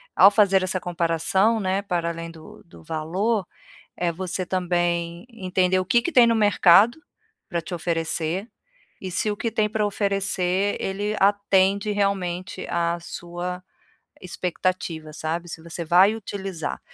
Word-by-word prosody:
ao 195 Hz, -, +8 dB
fazer 200 Hz, -2 st, +4 dB
essa 185 Hz, 0 st, -1 dB
comparação, 175 Hz, +5 st, +1 dB
né, 190 Hz, -1 st, 0 dB
para 175 Hz, -4 st, -2 dB
além 165 Hz, 0 st, -6 dB
do 160 Hz, -1 st, -14 dB
do 85 Hz, -, -16 dB
valor, 185 Hz, -, -1 dB, 0.5 s
eh, 175 Hz, -1 st, 0 dB
você 185 Hz, +1 st, -3 dB
também 175 Hz, 0 st, -1 dB
entender 185 Hz, -4 st, 0 dB
o 185 Hz, -, 0 dB
que 235 Hz, +6 st, +3 dB
que 345 Hz, -, -2 dB
tem 245 Hz, -4 st, +7 dB
no 230 Hz, -, +3 dB
mercado 205 Hz, -, +5 dB, 0.5 s
pra 175 Hz, -5 st, -2 dB
te 170 Hz, +2 st, -7 dB
oferecer 165 Hz, +3 st, -2 dB, 0.5 s
e 190 Hz, -, -5 dB
se 185 Hz, +4 st, 0 dB
o 205 Hz, -, -3 dB
que 230 Hz, -, -2 dB
tem 215 Hz, -1 st, +1 dB
pra 215 Hz, 0 st, -1 dB
oferecer, 195 Hz, -1 st, 0 dB
ele 205 Hz, +2 st, -2 dB
atende 200 Hz, 0 st, +3 dB
realmente 190 Hz, -3 st, -2 dB
à 170 Hz, 0 st, 0 dB
sua 175 Hz, +2 st, -6 dB, 0.6 s
expectativa, 175 Hz, -3 st, -3 dB
sabe, 165 Hz, +3 st, -4 dB
se 165 Hz, -1 st, -8 dB
você 170 Hz, +1 st, -6 dB
vai 185 Hz, +6 st, +5 dB
utilizar. 195 Hz, -6 st, -5 dB
185 Hz, 145 wpm, -24 LUFS, 170-200 Hz, 0.6 s, ao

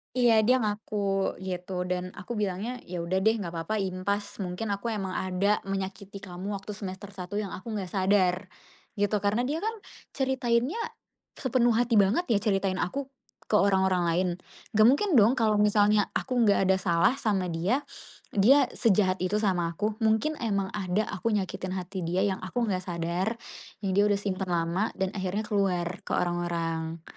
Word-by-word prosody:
Iya, 245 Hz, -2 st, +4 dB
dia 255 Hz, -, +5 dB
ngaku, 210 Hz, 0 st, -3 dB, 0.5 s
gitu 180 Hz, 0 st, -3 dB
dan 180 Hz, 0 st, -3 dB
aku 200 Hz, +5 st, -6 dB
bilangnya, 210 Hz, +5 st, -2 dB
"Ya 175 Hz, -1 st, -4 dB
udah 180 Hz, +3 st, 0 dB
deh. 220 Hz, +4 st, +3 dB
Gak 200 Hz, -6 st, -4 dB
apa-apa, 175 Hz, +6 st, -2 dB
impas. 195 Hz, +2 st, -3 dB
Mungkin 190 Hz, +2 st, -3 dB
aku 200 Hz, +3 st, -2 dB
emang 195 Hz, -3 st, -3 dB
ada 185 Hz, +3 st, +1 dB
menyakiti 195 Hz, 0 st, -5 dB
kamu 190 Hz, +2 st, -5 dB
waktu 195 Hz, +1 st, -6 dB
semester 200 Hz, -1 st, -7 dB
1 185 Hz, -1 st, -8 dB
yang 205 Hz, -2 st, -2 dB
aku 220 Hz, +4 st, -6 dB
gak 190 Hz, -4 st, -4 dB
sadar," 190 Hz, -1 st, +2 dB, 0.5 s
gitu. 205 Hz, -1 st, +1 dB
Karena 205 Hz, +4 st, +1 dB
dia 290 Hz, +5 st, -1 dB
kan 440 Hz, +6 st, -2 dB, 0.4 s
ceritainnya 260 Hz, -, 0 dB, 0.6 s
sepenuh 240 Hz, -3 st, +2 dB
hati 235 Hz, -1 st, +3 dB
banget 230 Hz, -, +2 dB
ya, 220 Hz, -, +4 dB
ceritain 195 Hz, -2 st, 0 dB
aku 270 Hz, +8 st, -3 dB, 0.4 s
ke 210 Hz, -, +5 dB
orang-orang 190 Hz, -2 st, +3 dB
lain. 175 Hz, +2 st, +1 dB, 0.4 s
Gak 215 Hz, 0 st, +5 dB
mungkin 285 Hz, -, +4 dB
dong 220 Hz, +4 st, +6 dB
kalau 220 Hz, -4 st, +2 dB
misalnya 210 Hz, 0 st, +4 dB
aku 250 Hz, -3 st, +1 dB
gak 200 Hz, -1 st, +4 dB
ada 190 Hz, -, +4 dB
salah 185 Hz, +8 st, +2 dB
sama 195 Hz, -7 st, 0 dB
dia, 185 Hz, -, 0 dB, 0.5 s
dia 250 Hz, +6 st, +5 dB
sejahat 195 Hz, -4 st, +2 dB
itu 195 Hz, +4 st, 0 dB
sama 175 Hz, -4 st, 0 dB
aku. 210 Hz, +4 st, -2 dB
Mungkin 225 Hz, +7 st, +1 dB
emang 200 Hz, -5 st, -1 dB
ada 200 Hz, +1 st, -1 dB
aku 210 Hz, +2 st, -1 dB
nyakitin 185 Hz, -1 st, -2 dB
hati 185 Hz, -1 st, -4 dB
dia 180 Hz, +3 st, +1 dB
yang 195 Hz, -2 st, 0 dB
aku 235 Hz, +6 st, -3 dB
gak 185 Hz, -1 st, -2 dB
sadar, 175 Hz, +5 st, -1 dB, 0.5 s
yang 195 Hz, -, -1 dB
dia 200 Hz, +2 st, +4 dB
udah 205 Hz, -1 st, +3 dB
simpen 190 Hz, -1 st, -2 dB
lama 175 Hz, +4 st, 0 dB
dan 190 Hz, -1 st, -1 dB
akhirnya 190 Hz, +1 st, -2 dB
keluar 185 Hz, -5 st, 0 dB
ke -, -, -1 dB
orang-orang 170 Hz, -2 st, -2 dB
200 Hz, 170 wpm, -28 LUFS, 185-220 Hz, 0.6 s, dong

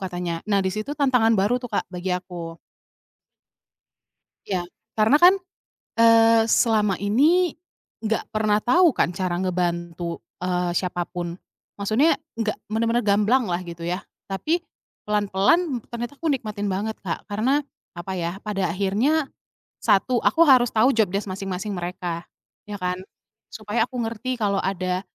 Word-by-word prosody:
katanya. 175 Hz, -3 st, -3 dB
Nah, 200 Hz, -1 st, +3 dB
di 190 Hz, -, +1 dB
situ 215 Hz, +8 st, -4 dB
tantangan 250 Hz, -6 st, +3 dB
baru 220 Hz, +6 st, +2 dB
tuh, 245 Hz, -, -6 dB
Kak, -, -, 0 dB
bagi 180 Hz, +1 st, -4 dB
aku. 170 Hz, -2 st, -8 dB, 1.9 s
Iya, 185 Hz, -3 st, -1 dB, 0.3 s
karena 220 Hz, +6 st, +5 dB
kan, 360 Hz, +3 st, +8 dB, 0.7 s
eee, 230 Hz, 0 st, +6 dB
selama 210 Hz, -5 st, +3 dB
ini 295 Hz, -, +3 dB, 0.5 s
nggak 225 Hz, 0 st, -1 dB
pernah 215 Hz, -1 st, +2 dB
tahu 345 Hz, +7 st, +5 dB
kan 170 Hz, -, +1 dB
cara 175 Hz, -1 st, -2 dB
ngebantu, 170 Hz, -2 st, -2 dB, 0.2 s
eee, 180 Hz, -1 st, 0 dB
siapapun. 175 Hz, -1 st, -3 dB, 0.4 s
Maksudnya 220 Hz, +11 st, +2 dB, 0.2 s
nggak 220 Hz, -2 st, -1 dB
benar-benar 230 Hz, +2 st, +1 dB
gamblang 210 Hz, +5 st, +3 dB
lah, 175 Hz, -1 st, -2 dB
gitu 170 Hz, -1 st, -8 dB
ya, 180 Hz, +2 st, -2 dB, 0.2 s
tapi 305 Hz, -, -1 dB, 0.4 s
pelan-pelan 210 Hz, -, +2 dB
ternyata 240 Hz, +4 st, -6 dB
aku 330 Hz, -, -3 dB
nikmatin 215 Hz, -7 st, -2 dB
banget, 205 Hz, +4 st, -2 dB
Kak, -, -, -4 dB
karena, 250 Hz, +8 st, +1 dB, 0.4 s
apa 180 Hz, +2 st, -5 dB
ya, 175 Hz, +2 st, -3 dB
pada 195 Hz, -4 st, -2 dB
akhirnya, 235 Hz, +11 st, +1 dB, 0.5 s
satu 240 Hz, +5 st, +2 dB
aku 330 Hz, -, +4 dB
harus 250 Hz, -2 st, +6 dB
tahu 225 Hz, +5 st, +5 dB
job 225 Hz, -5 st, +3 dB
desc 200 Hz, +1 st, -2 dB
masing-masing 195 Hz, +2 st, -4 dB
mereka, 175 Hz, -1 st, -4 dB, 0.4 s
iya 205 Hz, 0 st, -5 dB
kan? 180 Hz, 0 st, -1 dB, 0.5 s
Supaya 220 Hz, +2 st, -1 dB
aku 250 Hz, -, -10 dB
ngerti 230 Hz, +3 st, -3 dB
kalau 200 Hz, -3 st, 0 dB
ada, 185 Hz, -1 st, -1 dB
205 Hz, 140 wpm, -23 LUFS, 180-235 Hz, 1.9 s, kan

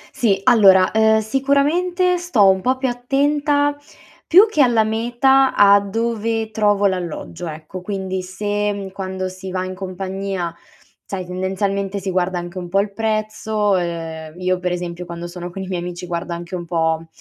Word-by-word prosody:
Sì, 200 Hz, -5 st, +2 dB
allora, 195 Hz, -6 st, +6 dB
ehm, 220 Hz, 0 st, +4 dB
sicuramente 300 Hz, -, +1 dB
sto 255 Hz, -, +3 dB
un 190 Hz, 0 st, +4 dB
po' 255 Hz, +4 st, +1 dB
più 260 Hz, 0 st, -1 dB
attenta, 285 Hz, +3 st, +1 dB, 0.5 s
più 380 Hz, +6 st, +8 dB
che 310 Hz, -9 st, +1 dB
alla 235 Hz, -4 st, +4 dB
meta 240 Hz, +5 st, +2 dB
a 200 Hz, 0 st, +7 dB
dove 225 Hz, +1 st, -2 dB
trovo 205 Hz, -2 st, +2 dB
l'alloggio, 175 Hz, -2 st, -3 dB
ecco. 155 Hz, +4 st, -8 dB
Quindi 190 Hz, -1 st, -3 dB
se 205 Hz, +1 st, -3 dB
quando 190 Hz, -1 st, -4 dB
si 185 Hz, +1 st, -8 dB
va 185 Hz, 0 st, -2 dB
in 185 Hz, -, -5 dB
compagnia, 190 Hz, -1 st, -4 dB, 0.5 s
sai 185 Hz, -2 st, -5 dB
tendenzialmente 195 Hz, +2 st, -2 dB
si 190 Hz, 0 st, -3 dB
guarda 180 Hz, 0 st, 0 dB
anche 175 Hz, +1 st, -6 dB
un 175 Hz, -1 st, -7 dB
po' 195 Hz, -, 0 dB
al 200 Hz, 0 st, 0 dB
prezzo, 215 Hz, -1 st, 0 dB
ehm, 165 Hz, -1 st, -4 dB
io 185 Hz, 0 st, 0 dB
per 180 Hz, -1 st, -2 dB
esempio 175 Hz, 0 st, -4 dB
quando 170 Hz, 0 st, -7 dB
sono 175 Hz, 0 st, -7 dB
con 190 Hz, +2 st, -6 dB
i -, -, -7 dB
miei 180 Hz, -2 st, -3 dB
amici 175 Hz, 0 st, -6 dB
guarda 170 Hz, 0 st, -4 dB
anche 170 Hz, +2 st, -9 dB
un 175 Hz, -1 st, -5 dB
po', 165 Hz, -1 st, -1 dB
195 Hz, 165 wpm, -20 LUFS, 180-225 Hz, 0.5 s, più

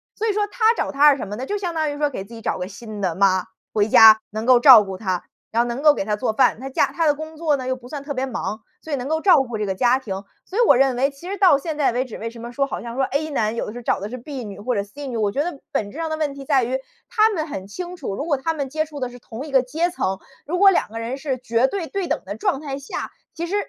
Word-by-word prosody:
所 445 Hz, -, -2 dB
以 425 Hz, -, +1 dB
说 415 Hz, 0 st, +1 dB
他 445 Hz, +1 st, +3 dB
找 -, -, -2 dB
她 290 Hz, +1 st, +6 dB
是 275 Hz, -, +1 dB
什 235 Hz, -, -5 dB
么 205 Hz, -, -4 dB
呢？ 260 Hz, -, -4 dB
就 415 Hz, -, -2 dB
相 360 Hz, -4 st, -3 dB
当 315 Hz, -1 st, 0 dB
于 290 Hz, -, -6 dB
说， 295 Hz, 0 st, +1 dB
给 225 Hz, -8 st, -5 dB
自 225 Hz, -, -14 dB
己 225 Hz, -, -9 dB
找 -, -, -1 dB
个 180 Hz, -, -4 dB
新 215 Hz, 0 st, -9 dB
的 185 Hz, -3 st, 0 dB
妈， 185 Hz, 0 st, +3 dB, 0.3 s
回 210 Hz, 0 st, +2 dB
家 220 Hz, 0 st, +8 dB
能 215 Hz, +2 st, -4 dB
够 255 Hz, -1 st, +7 dB
照 245 Hz, -4 st, +9 dB
顾 195 Hz, -1 st, -6 dB
他， 185 Hz, -3 st, -2 dB, 0.3 s
然 230 Hz, +1 st, +2 dB
后 240 Hz, -, 0 dB
能 240 Hz, +4 st, -4 dB
够 300 Hz, -1 st, +7 dB
给 195 Hz, -, -3 dB
他 210 Hz, 0 st, 0 dB
做 220 Hz, +1 st, -1 dB
饭。 215 Hz, -, +3 dB
她 265 Hz, +2 st, -6 dB
嫁 -, -, +3 dB
她 330 Hz, -, -1 dB
的 300 Hz, -, +4 dB
工 315 Hz, +1 st, -8 dB
作 310 Hz, -3 st, +1 dB
呢， 260 Hz, -2 st, -5 dB
又 260 Hz, -, 0 dB
不 245 Hz, -1 st, -13 dB
算 285 Hz, 0 st, -6 dB
特 285 Hz, 0 st, -5 dB
别 260 Hz, +1 st, -1 dB
忙， 225 Hz, -3 st, -4 dB, 0.2 s
所 320 Hz, -, -9 dB
以 -, -, +2 dB
能 255 Hz, -1 st, -4 dB
够 315 Hz, +2 st, 0 dB
照 360 Hz, -7 st, +6 dB
顾 240 Hz, -4 st, -5 dB
这 210 Hz, -, -1 dB
个 190 Hz, -, -1 dB
家 245 Hz, +5 st, +3 dB
庭。 205 Hz, -7 st, -5 dB, 0.3 s
所 385 Hz, -, -7 dB
以 485 Hz, -, +4 dB
我 -, -, +7 dB
认 265 Hz, 0 st, +3 dB
为， 275 Hz, +3 st, +1 dB
其 310 Hz, +6 st, -10 dB
实 400 Hz, -, -3 dB
到 370 Hz, -7 st, +6 dB
现 315 Hz, 0 st, -4 dB
在 290 Hz, -4 st, +2 dB
为 245 Hz, +2 st, 0 dB
止， 255 Hz, -4 st, -9 dB
为 230 Hz, +1 st, -5 dB
什 230 Hz, -, -12 dB
么 235 Hz, +1 st, -7 dB
说 275 Hz, +3 st, 0 dB
好 275 Hz, -, -5 dB
像 235 Hz, 0 st, -7 dB
说 265 Hz, -, +1 dB
A 290 Hz, +4 st, -1 dB
男， 220 Hz, -6 st, 0 dB
有 -, -, -3 dB
的 210 Hz, -, -6 dB
是 245 Hz, 0 st, -8 dB
找 -, -, +1 dB
的 205 Hz, -, -5 dB
是 250 Hz, -, -6 dB
B 260 Hz, +1 st, -7 dB
女 200 Hz, -2 st, -8 dB
或 245 Hz, +5 st, -1 dB
者 200 Hz, -3 st, 0 dB
C 280 Hz, +9 st, -10 dB
女， 255 Hz, -3 st, -5 dB
我 210 Hz, -2 st, +1 dB
觉 280 Hz, +7 st, 0 dB
得 315 Hz, -5 st, -5 dB
本 205 Hz, -2 st, -2 dB
质 -, -, -11 dB
上 325 Hz, -1 st, -2 dB
的 315 Hz, -, -2 dB
问 300 Hz, -3 st, -1 dB
题 275 Hz, 0 st, -9 dB
在 270 Hz, -3 st, +3 dB
于， 255 Hz, +3 st, -1 dB, 0.3 s
他 435 Hz, 0 st, +4 dB
们 335 Hz, -8 st, -2 dB
很 195 Hz, -10 st, -6 dB
清 360 Hz, -, -6 dB
楚， 260 Hz, -, -5 dB
如 285 Hz, -, -4 dB
果 295 Hz, -5 st, +1 dB
他 325 Hz, +4 st, -2 dB
们 280 Hz, -3 st, -3 dB
接 310 Hz, +3 st, -1 dB
触 295 Hz, -2 st, -9 dB
的 255 Hz, -, -2 dB
是 245 Hz, 0 st, -12 dB
同 235 Hz, +3 st, -8 dB
一 300 Hz, -, -9 dB
个 265 Hz, -2 st, +5 dB
阶 320 Hz, +8 st, -1 dB
层， 190 Hz, -, -1 dB, 0.3 s
如 350 Hz, +4 st, -1 dB
果 395 Hz, +1 st, +7 dB
2 360 Hz, -, 0 dB
个 225 Hz, -, -8 dB
人 230 Hz, +3 st, -4 dB
是 270 Hz, -2 st, -2 dB
绝 240 Hz, 0 st, +1 dB
对 380 Hz, +2 st, -3 dB
对 385 Hz, +2 st, -3 dB
等 -, -, -2 dB
的 -, -, -5 dB
状 385 Hz, -9 st, 0 dB
态 280 Hz, -2 st, -5 dB
下， 280 Hz, -, -6 dB, 0.2 s
其 335 Hz, -, -3 dB
实 360 Hz, +4 st, -3 dB
265 Hz, 350 characters per minute, -22 LUFS, 230-310 Hz, 0.3 s, 照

